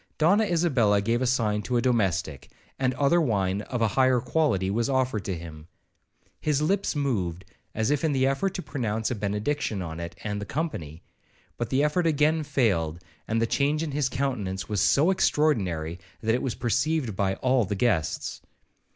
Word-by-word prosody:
Donna 200 +8 +4
Isabella 135 - +2
gave 115 +4 0
a 130 - +1
sign 110 -5 +1
to 125 +3 -1
a - - +2
domestic, 95 - 0 0.3
and 130 -2 +1
other 145 +5 +3
wine 100 - 0
of 120 +2 -3
a 110 - +3
higher 130 +1 +3
quality 120 - +1
was 115 +4 0
offered 130 -6 0
to 95 -3 -2
him. 80 -2 -10 0.7
His 150 -2 +1
lips 190 +4 0
moved, 95 - -1 0.3
as 110 +4 +1
if 145 0 0
in 160 - +2
the 130 -2 +2
effort 155 +9 0
to 180 - -4
pronounce 110 -4 -2
a - - +1
benediction 105 +3 -2
on 80 -1 -6
it 85 0 -6
and 105 -1 -3
the - - -4
company, 85 - -4 0.5
but 120 -2 -3
the 135 +3 +2
effort 165 +3 +1
again 155 +1 +2
failed; 105 - 0 0.3
and 115 +1 0
the 115 - +2
change 145 +6 +1
in 155 - -3
his 140 -2 0
countenance 105 -9 -2
was 105 -2 -1
so 155 +7 +4
extraordinary, 95 - +1 0.2
that 110 0 +1
it 125 - 0
was 130 - -2
perceived 130 0 0
by 95 0 0
all 130 -1 +2
the 100 +1 -2
guests. 95 -7 -1
120 Hz, 185 wpm, -26 LUFS, 100-145 Hz, 0.7 s, Donna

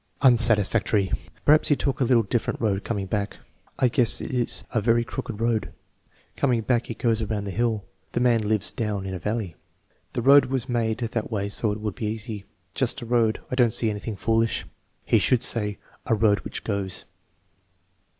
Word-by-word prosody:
Unsatisfactory. 110 -4 +6 0.3
"Perhaps 155 +1 +5
He 145 - +3
took 140 0 -2
a - - +5
little 120 -2 +3
different 110 +3 -2
road 105 -3 -1
coming 100 -4 -3
back." 100 +1 -3 0.4
"I 130 - +3
guess 120 -1 +4
it - - -6
is 125 -2 -1
a 110 - 0
very 115 +2 +2
crooked 115 -2 -6
road." 115 -1 -1 0.6
"Coining 125 -4 +1
back 120 0 0
he 115 - -6
goes 115 -1 0
around 105 -1 -3
the 100 - -5
hill." 110 -1 -1 0.3
"The - - 0
man 120 -2 +2
lives 105 -1 0
down 105 -4 -3
in 95 - -5
a 90 - -5
valley." 105 -2 -3 0.6
"The 120 - -3
road 140 +2 +7
was 130 -1 -3
made 115 -3 -1
that 115 -2 -3
way 100 -3 -3
so 105 +1 0
it 105 - -5
would 105 -2 -4
be 110 - -4
easy." 105 -2 -6 0.3
"Just 125 -2 -1
a - - -7
road. 115 -2 +1
I - - -3
don't 120 -4 +2
see 110 -2 +2
anything 105 +1 -5
foolish." 115 +2 0 0.4
"He - - +3
should 125 -1 +2
say, 105 -4 0 0.3
'a 115 - +2
road 105 -1 +2
which - - -7
goes.' 100 -3 -4
115 Hz, 190 wpm, -24 LUFS, 105-120 Hz, 0.6 s, road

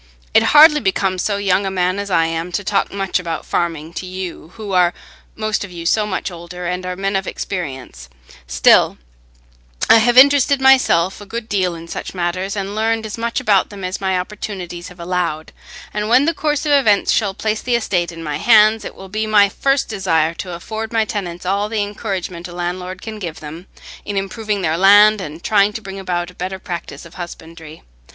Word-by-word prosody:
It - - +6 0.2
hardly 300 0 +8
becomes 190 -4 0
so 200 0 -1
young 200 -1 +1
a 195 - -1
man 185 0 0
as 200 0 -4
I 165 -3 +3
am 165 +2 -3
to 205 - -1
talk 200 +1 0
much 195 -2 -1
about 165 -3 -5
farming 165 -2 -2
to 185 - -6
you, 180 -3 -7
who 215 -3 -7
are 180 -1 +3 0.4
most 215 -1 -2
of 200 - -8
you 170 -1 -8
so 210 +4 +2
much 190 -1 -3
older, 175 +1 -8
and 180 +1 -3
are 180 - -3
men 195 +1 -2
of 195 0 -1
experience; 135 - -6 0.4
still, - - +4 0.9
I 225 - +8
have 240 +2 +2
interested 280 +1 +6
myself 260 -9 +3
a - - -9
good 230 +2 -5
deal 185 -5 0
in 165 0 -10
such 170 - -6
matters, 185 +3 -2
and 200 0 -4
learned 225 +1 0
as 215 - -5
much 235 +2 -2
about 210 -7 +2
them 200 -2 -10
as 185 +2 -4
my 190 -1 0
opportunities 180 -2 -6
have 180 -1 -14
allowed; 170 -3 -2 0.4
and 210 0 -2
when 255 +4 +5
the 330 - +1
course 300 -1 -1
of 295 - +1
events 225 -8 +3
shall 200 -4 +1
place 215 0 -2
the 245 -1 0
estate 180 -7 0
in 165 -1 -9
my 150 -2 -3
hands, 215 -1 +5
it - - -8
will 190 - -11
be 215 +3 -3
my 205 -2 +5
first 275 +6 0
desire 170 -6 0
to 180 +1 -7
afford 220 +5 -6
my 225 -1 +1
tenants 180 -5 -5
all 200 +3 0
the 215 -2 0
encouragement 190 -4 -5
a 175 - -11
landlord 180 +1 -5
can 220 -1 -7
give 170 -5 -6
them, 160 +4 -9 0.4
in 205 -1 -4
improving 205 +1 -3
their 160 -1 0
land 205 +2 +6
and 160 -1 -8
trying 205 -1 +3
to 210 - -6
bring 195 -2 -8
about 175 -2 -3
a - - -20
better 185 +2 -5
practice 170 -5 -7
of 170 - -14
husbandry. 165 -3 -10
190 Hz, 205 wpm, -18 LUFS, 175-215 Hz, 0.9 s, hardly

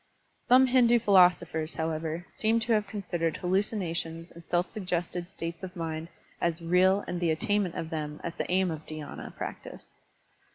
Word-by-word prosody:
Some 255 +2 +7
Hindu 245 -2 +5
philosophers, 175 -6 +3
however, 160 +1 -2
seem 225 +1 +1
to 230 +1 +1
have 210 -2 +1
considered 175 -6 -2
hallucinations 175 -3 -1
and 170 - -13
self 175 +2 0
suggested 175 -3 -3
states 170 -3 -6
of 185 0 -7
mind 165 -1 -4 0.3
as 170 -1 +1
real 185 +4 +4
and 175 - -3
the 170 -1 +1
attaimnent 185 +3 0
of 160 - -4
them 150 -1 -4
as 170 - -3
the - - -4
aim 185 -1 +2
of 155 -1 -6
dhySna 155 -2 -7
practice. - - -8
175 Hz, 160 wpm, -29 LUFS, 165-195 Hz, 0.3 s, Some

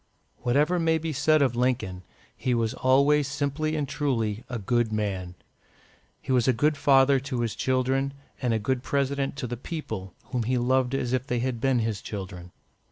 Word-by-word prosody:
Whatever 145 +8 +2
may 160 -1 +2
be 160 0 -3
said 155 +2 +3
of 125 -3 +1
Lincoln, 120 -7 0 0.3
he 125 -2 0
was 115 -1 0
always 140 +2 +3
simply 150 +2 -1
and 150 -2 -1
truly 120 -7 -1
a 125 - -3
good 115 +2 0
man. 95 -4 -2 0.8
He - - -5
was 125 -1 +3
a 130 - +5
good 150 +6 +2
father 135 -1 +5
to 130 -2 -3
his 115 -2 -1
children, 130 +1 0 0.3
and 125 -3 +1
a 115 - +2
good 120 +4 -1
President 140 0 -1
to 140 - -4
the 120 0 -4
people, 110 - -6 0.2
whom 125 -2 0
he 125 +3 0
loved 130 +1 +1
as 125 -2 -1
if 130 +1 -1
they 125 - 0
had 120 -1 -2
been 135 -1 +2
his 110 -3 -1
children. 95 -3 -7
130 Hz, 185 wpm, -26 LUFS, 115-140 Hz, 0.8 s, a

